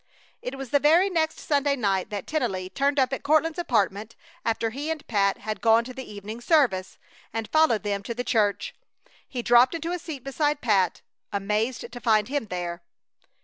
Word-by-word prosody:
It 260 +2 -5
was 270 -2 -7
the 285 - +4
very 335 +7 +4
next 320 -2 0
Sunday 285 -1 +1
night 195 -7 0
that 205 -2 -5
Tennelly 195 -12 -2
turned 280 +1 +1
up 260 0 +2
at - - -3
Courtland's 315 +3 +2
apartment 215 - 0 0.3
after 225 0 0
he 285 +6 -4
and 320 -2 -3
Pat 200 -3 +1
had 215 0 -5
gone 225 0 +5
to 255 +2 -8
the 260 -3 -8
evening 210 +3 -7
service, 240 - +2 0.3
and 225 0 -3
followed 310 -8 +3
them 200 -1 -1
to 235 +4 -5
the 245 - -2
church. 215 -6 0 0.6
He 245 -2 -4
dropped 240 +6 +5
into 330 +1 -3
a 360 - -2
seat 305 -6 -7
beside 290 +2 0
Pat, 195 - +1 0.3
amazed 210 +6 -1
to 245 - -8
find 215 -3 +2
him 285 -5 -2
there. 175 -2 -4
240 Hz, 190 wpm, -26 LUFS, 210-290 Hz, 0.6 s, gone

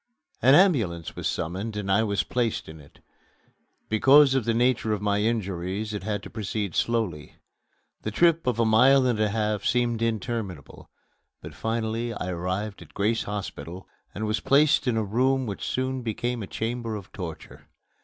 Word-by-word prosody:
An 130 +3 +6
ambulance 110 - +2
was - - -3
summoned 100 +6 -3
and 100 -2 -2
I 100 +3 +4
was 100 -8 0
placed 115 - -1
in 80 0 -10
it. 75 -1 -18 0.9
Because 135 +5 +6
of 135 -4 +1
the 115 - +1
nature 120 -2 +2
of 105 - -1
my 100 0 +1
injuries 105 -1 -2
it 105 - -4
had 105 -1 -3
to - - -8
proceed 105 -3 -3
slowly. 110 -11 -1 0.7
The - - -3
trip 165 +5 +2
of 125 - +1
a 115 - +4
mile 130 +5 +5
and 120 -4 +1
a 105 -1 +2
half 105 -1 -1
seemed 120 -2 +1
interminable, 115 - -4 0.5
but - - -10
finally 115 +1 -2
I 90 - -4
arrived 90 +4 -3
at - - -15
Grace 110 +3 0
Hospital 95 -4 -6 0.3
and 110 - -3
was 105 0 0
placed 140 +1 +3
in 120 -3 +1
a 110 - +1
room 130 +5 +1
which 100 -4 -5
soon 130 0 -2
became 120 +1 -3
a 100 - -6
chamber 115 +1 -3
of 100 -2 -9
torture. 85 -5 -9
110 Hz, 175 wpm, -26 LUFS, 100-120 Hz, 0.9 s, An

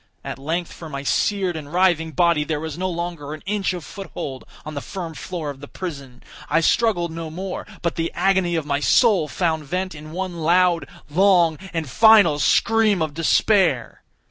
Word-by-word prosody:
At - - -6
length 165 +5 -3
for 160 - -10
my 140 -2 -5
seared 190 +4 0
and 150 -2 -7
writhing 170 -3 +2
body 170 0 +3
there 150 0 -2
was 160 -1 -5
no 185 +2 -2
longer 170 -4 -5
an 155 - -14
inch 200 -1 0
of 175 -4 -6
foothold 165 -9 -7 0.2
on 155 - -6
the 140 - -4
firm 175 -2 -6
floor 160 -2 -5
of 135 - -12
the 145 - -10
prison. 140 -9 -8 0.3
I 165 - +3
struggled 175 -2 +2
no 165 0 -6
more, 185 +4 -6 0.2
but 170 - -1
the 165 0 -1
agony 185 -1 +2
of 160 -3 -1
my 140 -1 0
soul 195 - +3
found 160 +2 -1
vent 185 +5 -3
in 155 0 -10
one 180 0 -4
loud, 175 +1 +3 0.2
long, 170 -1 +3
and 165 -3 -3
final 210 - +6
scream 220 +4 +3
of 155 -2 -1
despair. 165 - +2
170 Hz, 185 wpm, -22 LUFS, 150-185 Hz, 0.3 s, final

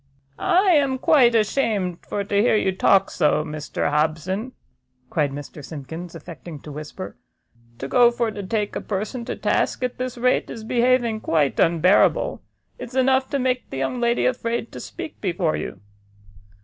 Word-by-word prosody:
"I 375 +1 +3
am 280 -5 +3
quite 255 -3 +4
ashamed 210 -6 +1
for 200 - -2
to 200 0 +1
hear 230 - +3
you 195 -2 +2
talk 190 +1 +3
so, 150 0 +2
Mr 150 -1 -3
Hobson!" 165 - -1 0.6
cried 150 -3 +1
Mr 145 +1 -8
Simkins, 160 +4 -8
affecting 165 -1 -9
to 150 - -9
whisper; 150 +1 -8 0.6
"to 135 - -5
go 240 - +5
for 235 -2 -1
to 205 - -6
take 205 +1 -2
a - - -2
person 215 +5 -4
to - - -4
task - - 0
at 250 0 -3
this 255 -1 -3
rate, 250 +1 +1
is 225 - -7
behaving 240 -1 +2
quite 150 -4 +1
unbearable; 180 - +3 0.4
it's 245 - -8
enough 260 0 +3
to 280 - 0
make 255 -1 -1
the - - -6
young 135 - -2
lady 235 0 +2
afraid 235 -2 -1
to - - -8
speak 310 - -8
before 175 -4 0
you." - - -5
215 Hz, 165 wpm, -23 LUFS, 165-250 Hz, 0.6 s, go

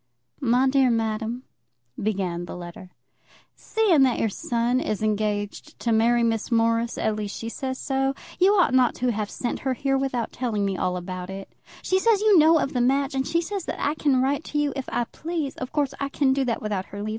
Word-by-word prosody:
MY 255 +1 +3
DEAR 265 -1 +4
MADAM, 225 +1 -1 0.6
[began 185 -4 -2
the - - -8
letter] 175 +1 -9 0.7
Seeing 410 -10 +2
that 260 -3 +4
your 225 - +1
son 235 +4 0
is 215 -4 -2
engaged 210 -1 -2
to 235 - -1
marry 235 +2 +3
Miss 225 -2 0
Morris, 230 0 +1
at 220 - 0
least 210 -1 -4
she 230 - -5
says 260 +2 -4
so, 270 0 -1 0.2
you 380 +3 +5
ought 355 -9 +3
not 255 -1 +4
to 250 0 0
have 210 -2 -3
sent 245 - -3
her 260 -1 -1
here 270 +2 0
without 255 -4 -2
telling 220 -5 -1
me 195 -1 -1
all 180 0 -1
about 180 0 -6
it. 195 0 -8 0.3
She 375 - +2
says 445 0 +3
you 420 -4 +5
know 320 +2 +6
of 275 - -1
the 250 - +1
match, 275 +3 +2
and 265 0 -1
she 335 - +1
says 385 +1 -4
that - - -4
I 290 - +1
can 275 -4 +2
write 280 +3 0
to 295 - -4
you 295 -2 +1
if 270 -2 -5
I 240 - +1
please. 310 +2 -4
Of 255 - -5
course, 285 -3 0
I 280 - -2
can 275 -1 +2
do 270 0 0
that 230 -3 -2
without 205 -3 -2
her 205 +1 -7
leave. 215 - -3
250 Hz, 220 wpm, -24 LUFS, 215-275 Hz, 0.7 s, know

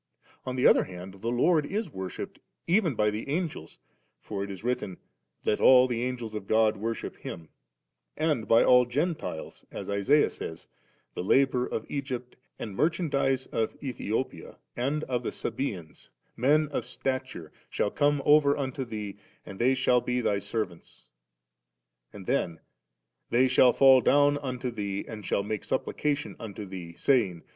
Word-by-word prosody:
On 130 - -2
the 125 - +1
other - - +6
hand, 95 +1 -10
the 115 - -4
Lord 150 +7 +3
is 200 +3 -3
worshipped 95 -5 -6 0.3
even 170 - +2
by 105 0 +2
the 110 +6 -5
Angels; 155 - -3 0.4
for 100 -2 -5
it 100 - -6
is 95 0 -8
written, 110 -6 -2 0.2
« 65 - -40
Let 105 - +1
all 130 0 +7
tfie 125 +1 -1
Angek 120 -3 -7
of 105 -2 -6
God 110 -1 +3
worship 115 +3 -4
Him';* 85 -3 -8 0.7
and 150 -8 0
by 115 - +6
all 125 0 +6
the - - -17
Gentilesi 155 - -3
as - - -6
Isaiah 115 +10 +3
says, 80 - -8 0.5
'The - - -4
labour 130 +4 +3
of 110 - -4
Egypt 130 -3 -5 0.2
and 105 -4 -6
merchandize 140 - +1
of 110 - -2
Ethiopia 125 - -3 0.2
and 140 +5 -1
of 125 -4 -1
the - - -2
Sabeansy 105 - -5 0.3
men 150 +5 +3
of 145 - -2
stature, 130 - -4 0.2
shall 105 - -1
come 145 -1 +2
over 145 -1 +5
wito 135 -1 -3
thee^ 105 -4 -6 0.3
and 95 - -9
they 130 +3 +3
shall 125 -1 +3
be 125 +1 -1
thy 105 -4 +1
servants;* 100 -4 -6 1.0
and 100 -2 -10
then, 85 -2 -1 0.7
'they 125 +2 +4
shall 125 -1 +5
M 135 -2 +7
down 145 0 +4
unto 125 -2 -4
thee, 100 -3 -3
and 110 -2 -8
shall 100 - 0
make 105 0 -3
supplication 145 -9 -2
unto 105 -2 -7
thee, 90 -3 -8
saying. 100 -6 +1
125 Hz, 160 wpm, -28 LUFS, 100-140 Hz, 1.0 s, all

